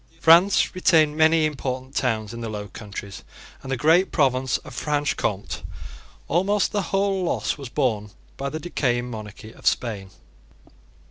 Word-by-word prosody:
France 170 +5 +5
retained 160 -5 +3
many 160 0 +4
important 130 -3 -4
towns 110 -4 -1
in 115 - -7
the 115 - -4
Low 105 -1 -5
Countries 100 -2 -8 0.4
and 135 - -7
the 135 - 0
great 165 +8 +4
province 130 -4 +2
of - - -12
Franche 145 -1 -1
Comte. 75 - -3 0.7
Almost 195 +4 +1
the 205 - 0
whole 195 -1 +1
loss 175 - -1
was 140 -4 -8
borne 110 -7 -1 0.3
by 140 0 -3
the 155 - -5
decaying 125 -7 -1
monarchy 110 +1 -9
of - - -7
Spain. 105 -6 0
135 Hz, 150 wpm, -24 LUFS, 110-160 Hz, 0.7 s, France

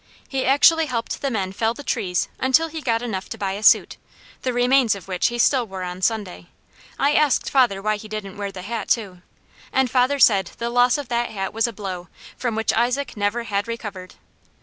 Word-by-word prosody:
He 265 -1 -2
actually 315 +4 +5
helped 235 -3 -3
the 275 - 0
men 195 -6 -2
fell 225 +4 -1
the 290 - -9
trees 190 -10 -1
until 285 +6 +3
he 320 0 -6
got 230 -3 0
enough 195 -6 -4
to - - -6
buy 195 -1 -2
a 200 +2 -5
suit, - - +4 0.4
the 255 - -1
remains 245 -2 +3
of 195 -3 -11
which 185 -2 +1
he 240 - -3
still 245 0 +3
wore 190 -2 -6
on 180 +1 -6
Sunday. 195 -4 -2 0.5
I 285 +1 +2
asked 300 -3 +2
father 240 -8 +3
why 215 0 +1
he 215 - -10
didn't 215 -2 -6
wear 200 -1 -4
the 185 -1 -9
hat 230 +2 -4
too, 195 -6 -1 0.5
and 265 -2 +1
father 260 +2 +2
said 200 -8 +4
the 235 0 -3
loss 245 +2 +4
of 285 -4 -6
that 240 0 0
hat 195 -3 -4
was 225 +2 +1
a - - -4
blow, 190 -4 -6 0.3
from 240 -3 -2
which 225 0 0
Isaac 250 +5 0
never 210 +3 -1
had 205 -2 -2
recovered. 205 -5 -7
225 Hz, 215 wpm, -22 LUFS, 195-250 Hz, 0.5 s, actually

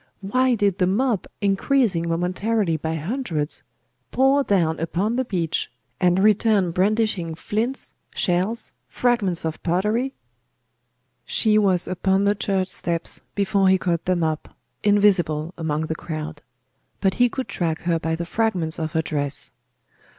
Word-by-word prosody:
Why 255 +6 +2
did 200 -3 +1
the 180 - +3
mob, 220 +2 0
increasing 200 -3 +1
momentarily 180 +2 0
by 160 +1 -3
hundreds, 165 - -2 0.5
pour 270 +2 +3
down 170 -8 +1
upon 180 +8 -1
the 260 - +1
beach, 175 -9 -2 0.3
and 180 0 +3
return 205 -2 +3
brandishing 190 -2 0
flints, 225 +10 -3 0.2
shells, 185 +6 0 0.2
fragments 210 -9 0
of 160 -1 -4
pottery? 210 +10 0 1.1
She 215 - +2
was 190 -4 +3
upon 190 +2 +1
the 205 0 +3
church 195 -2 -1
steps 170 -2 0
before 195 -1 +2
he 190 - +5
caught 170 -3 -1
them 180 -2 +1
up, 155 -1 -3 0.2
invisible 185 -6 +2
among 155 -2 -2
the 160 0 -2
crowd; 155 -2 -6 0.6
but 195 -1 +2
he 245 - +6
could 260 +1 -4
track 170 -5 -2
her 170 -1 0
by 160 0 -1
the 170 +1 -4
fragments 180 -5 0
of 160 -1 -3
her 160 -1 +1
dress. 145 -2 -1
185 Hz, 140 wpm, -23 LUFS, 165-215 Hz, 1.1 s, he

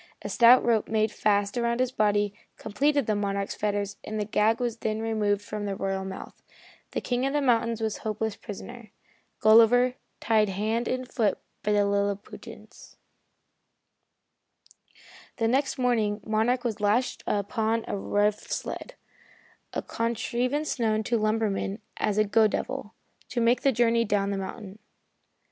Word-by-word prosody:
A - - -4
stout 240 +2 +6
rope 230 -3 +2
made 220 -1 +1
fast 205 +1 +1
about 235 0 0
his 255 -1 +1
body 205 -3 +1 0.2
completed 285 +5 +1
the 215 - 0
Monarch's 200 -1 -2
fetters 205 -1 -2
and 215 0 -4
the 210 - -1
gag 215 +2 +2
was 240 -2 -2
then 220 -1 -2
removed 210 -2 0
from 210 0 -5
the 195 - -2
royal 195 0 -2
mouth. 190 0 -7 0.6
The - - -1
King 245 0 -1
of 275 - -2
the 295 - +2
mountains 235 -3 +1
was 220 -1 -1
a - - -15
hopeless 220 0 -2
prisoner 230 +2 -9 0.5
Gulliver, 230 +3 +6 0.3
tied 215 -2 +2
hand 220 +5 -1
and 255 0 -2
foot 225 -5 0 0.2
by 210 +1 0
the 205 -1 +3
Lilliputians. 200 0 -4 2.4
The 225 - +1
next 270 +4 +1
morning 225 -5 +1
Monarch 225 +3 +1
was 225 -3 -3
lashed 215 +5 +1
upon 220 +2 0
a - - -2
rough 205 +1 +1
sled - - -5 0.8
a - - -3
contrivance 245 +5 -2
known 220 -2 +1
to 235 +2 0
lumbermen 215 -2 0 0.2
as 210 -1 0
a 215 - +5
"go 215 +1 +4
devil" 240 0 -4 0.3
to 245 - -2
make 235 +1 +3
the 275 - +3
journey 235 -1 +3
down 200 -2 0
the 200 - -2
mountain. 195 +1 -7
220 Hz, 155 wpm, -27 LUFS, 205-235 Hz, 2.4 s, stout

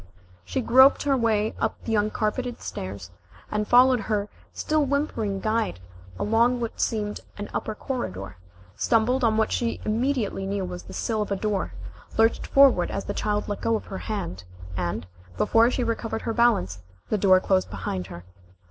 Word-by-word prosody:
She 260 - -2
groped 260 +4 +6
her 280 -1 +2
way 220 -3 +1
up - - 0
the 225 - -2
uncarpeted 215 +4 -1
stairs, 95 -1 -6 0.4
and 210 0 -1
followed 250 +1 +6
her 210 -1 -2 0.2
still 310 -1 0
whimpering 265 -8 -1
guide 215 - -1 0.4
along 235 +3 +2
what 230 -1 -4
seemed 210 -2 -1 0.2
an 205 0 -6
upper 215 - -3
corridor, 95 - -5 0.4
stumbled 230 - +2
on 220 -2 +3
what 220 - +1
she 235 -1 -1
immediately 225 -4 -1
knew 195 -1 -2
was 180 -1 -6
the - - -12
sill 220 -2 -1
of 210 - -3
a - - +2
door, 205 0 -2 0.4
lurched 225 +1 +3
forward 270 -10 +5
as 195 - -4
the - - -3
child 210 0 -1
let 205 - -4
go 230 - +1
of 220 - -4
her 190 - -4
hand, 185 - -4 0.3
and, 85 -2 -2 0.3
before 230 - +4
she 250 0 -1
recovered 230 -1 -2
her 225 - -2
balance, 95 - +2 0.3
the 215 - +1
door 185 -1 +6
closed 185 0 +1
behind 90 -1 -4
her. 85 -2 -9
215 Hz, 170 wpm, -25 LUFS, 195-235 Hz, 0.4 s, groped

